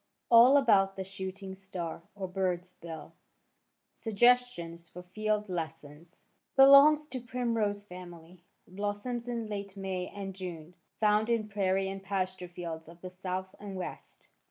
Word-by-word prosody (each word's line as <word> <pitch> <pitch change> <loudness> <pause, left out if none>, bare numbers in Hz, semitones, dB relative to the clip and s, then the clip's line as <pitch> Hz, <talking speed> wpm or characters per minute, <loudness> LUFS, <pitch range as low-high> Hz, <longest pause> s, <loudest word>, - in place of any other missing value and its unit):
ALL 240 +4 +8
ABOUT 200 -8 +4
THE 190 - -4
SHOOTING 190 0 -6
STAR 185 -4 -5
OR 195 -2 -4
BIRD'S 180 -1 -2
BILL 165 -3 -9 0.8
SUGGESTIONS 220 -7 +1
FOR 180 - -10
FIELD 210 +3 -1
LESSONS 165 -2 -7 0.3
Belongs 280 +3 +8
to 260 -4 -6
primrose 230 -5 -1
family. 175 -2 -11 0.2
Blossoms 205 +6 -4
in 235 -2 -2
late 200 -2 -6
May 190 -2 -3
and 195 -1 -6
June. 175 -3 -7 0.3
Found 215 +1 +3
in 230 -2 +1
prairie 195 -1 +1
and 195 0 -5
pasture 185 -2 -3
fields 165 -2 -7
of 170 0 -15
the 185 - -7
South 185 0 -4
and 200 -2 -7
West. 185 -1 -8
195 Hz, 135 wpm, -30 LUFS, 180-215 Hz, 0.8 s, ALL